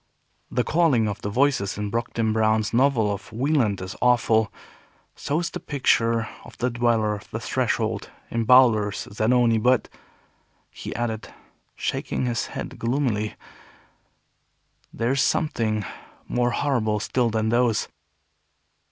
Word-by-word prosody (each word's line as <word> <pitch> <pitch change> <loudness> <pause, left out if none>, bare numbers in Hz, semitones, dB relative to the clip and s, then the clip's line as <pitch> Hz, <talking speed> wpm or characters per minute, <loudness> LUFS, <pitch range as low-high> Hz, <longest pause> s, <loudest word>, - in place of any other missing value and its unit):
The 125 - 0
calling 145 -6 +2
of 105 +1 -4
the 100 - -3
voices 115 -5 +1
in 105 -1 -3
Brockden 115 -1 -1
Brown's 110 0 +1
novel 120 -4 +3
of 100 +2 -9
Wieland 120 -4 +1
is 95 0 -6
awful; 115 -3 +3 0.6
so 145 - -2
is 170 - -3
the - - -5
picture 115 -5 +1 0.2
of - - -14
the 125 +1 0
Dweller 115 -3 +1
of 105 - -9
the - - -4
Threshold, - - -1 0.2
in 115 0 0
Bulwer's 110 -5 +4
Zanoni; 115 +1 +3
but," 125 +2 +2 0.8
he - - -7
added, 110 -2 -3 0.4
shaking - - -2
his 120 -2 -1
head - - -7
gloomily, 115 -4 -1 1.6
"there 115 +2 -1
is 135 0 +2
something 110 - 0 0.4
more 120 0 +1
horrible 120 -5 0
still 120 +3 0
than 110 0 0
those." 120 -2 +2
115 Hz, 130 wpm, -24 LUFS, 110-125 Hz, 1.6 s, Bulwer's